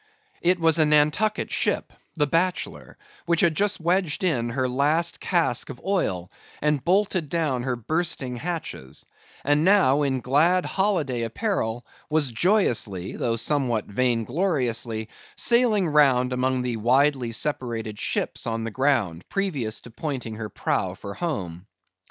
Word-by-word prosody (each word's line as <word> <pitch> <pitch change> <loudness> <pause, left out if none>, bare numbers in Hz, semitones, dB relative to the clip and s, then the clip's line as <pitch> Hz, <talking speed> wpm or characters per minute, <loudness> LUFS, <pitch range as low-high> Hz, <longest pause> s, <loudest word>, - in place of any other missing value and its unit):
It 180 +1 +2
was 165 -1 +3
a 155 - +6
Nantucket 150 +8 +2
ship, - - -1 0.2
the 150 -3 +2
Bachelor, 170 +5 -1 0.3
which 170 -1 +2
had 170 - +3
just 200 +5 0
wedged 175 +1 0
in 125 -10 +1
her 130 +2 -1
last 150 +7 +1
cask 170 -9 0
of 125 - -8
oil, 95 - -1 0.3
and 150 -3 0
bolted 185 -3 +1
down 150 -6 0
her 125 0 -1
bursting 135 0 -2
hatches; 160 - -5 0.4
and 145 +2 +3
now, 180 -7 +4
in 135 -2 0
glad 160 +9 +2
holiday 170 - 0
apparel, 120 - -2 0.2
was 150 -4 +1
joyously, 115 - +1
though 115 -1 -1
somewhat 120 -3 0
vain 120 +2 0
gloriously, 120 - -1 0.3
sailing 235 -6 +3
round 135 -4 +3
among 130 0 0
the 120 -2 -2
widely 130 +2 +2
separated 115 -5 -2
ships - - -2
on 115 0 -2
the 115 - -4
ground, 115 - 0
previous 145 - -2
to 120 - -13
pointing 130 -4 -4
her 110 -1 -5
prow - - -1
for 100 - -8
home. 100 - -4
140 Hz, 140 wpm, -24 LUFS, 120-170 Hz, 0.4 s, a